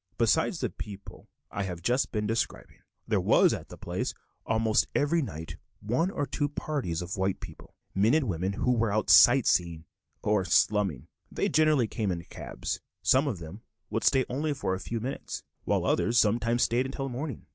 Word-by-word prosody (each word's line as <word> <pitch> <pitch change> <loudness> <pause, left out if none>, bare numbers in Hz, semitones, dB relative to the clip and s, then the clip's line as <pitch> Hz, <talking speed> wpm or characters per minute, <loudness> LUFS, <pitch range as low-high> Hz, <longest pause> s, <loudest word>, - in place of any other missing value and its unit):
Besides - - +2
the - - -1
people 100 -1 -10 0.2
I 100 - -3
have 90 -3 -5
just 125 +6 +1
been 105 -2 -1
describing, 115 +2 -3 0.3
there - - +1
was - - +4
at - - -6
the - - -10
place - - -3 0.3
almost 110 -1 +2
every 160 +3 +2
night 80 - -6 0.2
one 125 - 0
or 145 -6 -2
two 145 +1 -2
parties 135 - -3
of 90 +3 -5
white 95 0 0
people, - - -12 0.2
men 105 +8 +3
and 155 -5 +1
women, 95 +1 -1
who 125 - 0
were 115 -3 +1
out 110 +1 +1
sight 125 0 +7
seeing, 85 -2 +1 0.4
or 105 -2 +2
slumming. 90 -5 +1 0.2
They - - 0
generally 155 -5 +3
came 105 -3 -2
in 85 -1 -4
cabs; - - -6 0.2
some 135 +3 +4
of 120 -9 -2
them 85 +6 -9 0.3
would - - -1
stay 130 -1 +3
only 145 +4 -1
for 95 -9 -2
a 95 - -3
few 115 +3 -4
minutes, 125 +5 -5 0.2
while - - +1
others 120 +1 +1
sometimes 115 +2 +3
stayed 125 +3 +1
until 135 +1 -4
morning. 135 0 -5
115 Hz, 185 wpm, -28 LUFS, 95-130 Hz, 0.4 s, sight